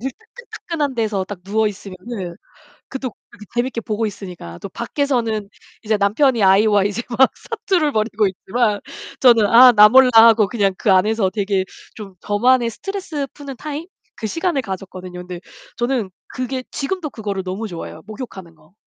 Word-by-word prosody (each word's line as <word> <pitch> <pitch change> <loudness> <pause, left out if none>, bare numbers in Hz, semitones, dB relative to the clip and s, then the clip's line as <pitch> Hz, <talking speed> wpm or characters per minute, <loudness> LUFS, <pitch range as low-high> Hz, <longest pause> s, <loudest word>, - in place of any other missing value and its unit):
물 265 +3 -3
따끈따끈한 355 - -6
데서 215 -5 -1
딱 185 -1 -8
누워있으면은 200 -2 -3 0.5
그것도 260 -3 -5 0.4
재밌게 240 0 -1
보고 215 +1 -2
있으니까. 180 - -8
또 - - -6
밖에서는 230 -2 -2 0.3
이제 215 0 +1
남편이 225 +4 +2
아이와 200 +1 +5
이제 205 +3 -1 0.2
막 265 +1 +5
사투를 380 -10 -1
벌이고 215 -1 +1
있지만 210 +3 -1 0.4
저는 235 -4 +6
아 245 +4 +8
나 210 -2 +8
몰라 260 +3 +6
하고 225 -2 +7
그냥 200 -3 0
그 205 - +1
안에서 195 +1 +3
되게 195 -1 -1 0.3
좀 200 -4 -10
저만의 240 +5 +2
스트레스 350 - -5
푸는 280 -2 -8
타임? 300 +4 -6 0.3
그 220 - -3
시간을 330 - -1
가졌거든요. 185 -3 -7
근데 180 -1 -7 0.4
저는 240 -4 -1 0.2
그게 255 0 -4
지금도 315 +2 -3
그거를 205 -6 -4
너무 190 +4 -4
좋아해요. 170 -4 -8
목욕하는 210 -6 -9
거. 155 +1 -25
220 Hz, 355 characters per minute, -20 LUFS, 195-260 Hz, 0.5 s, 아